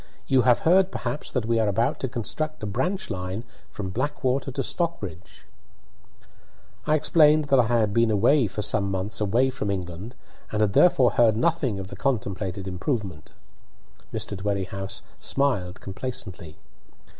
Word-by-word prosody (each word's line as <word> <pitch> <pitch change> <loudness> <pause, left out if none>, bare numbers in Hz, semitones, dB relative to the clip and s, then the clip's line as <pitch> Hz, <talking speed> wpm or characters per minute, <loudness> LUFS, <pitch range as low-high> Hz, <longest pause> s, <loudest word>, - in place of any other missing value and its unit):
You 130 -1 +4
have 125 -1 +4
heard 185 +3 +4
perhaps 150 - -4
that 125 -4 -1
we 115 0 +1
are 110 - +2
about 110 +4 +1
to 130 - -1
construct 135 +5 -3
a - - -1
branch 130 - -2
line 90 +4 -4 0.3
from 95 -3 -5
Blackwater 130 +2 -1
to 135 - -2
Stockbridge." 100 - -4 1.4
I 155 - +4
explained 155 0 +4
that 135 - +5
I 120 - +4
had 110 -3 +2
been 115 +4 +3
for 105 +2 -4
some 100 0 +1
months 95 +3 -3
away 120 +6 +2
from 125 -6 -3
England, 95 +4 -5 0.4
and 105 - -1
had 105 -2 +2
therefore 155 -7 +5
heard 115 -3 +4
nothing 135 -5 +1
of 95 0 -7
the - - -8
contemplated 100 -7 -2
improvement. 95 - -4 0.8
Mr. - - -4
Dwerrihouse 95 0 -3 0.2
smiled 105 -10 0
complacently. 95 -7 -5
115 Hz, 145 wpm, -25 LUFS, 95-135 Hz, 1.4 s, that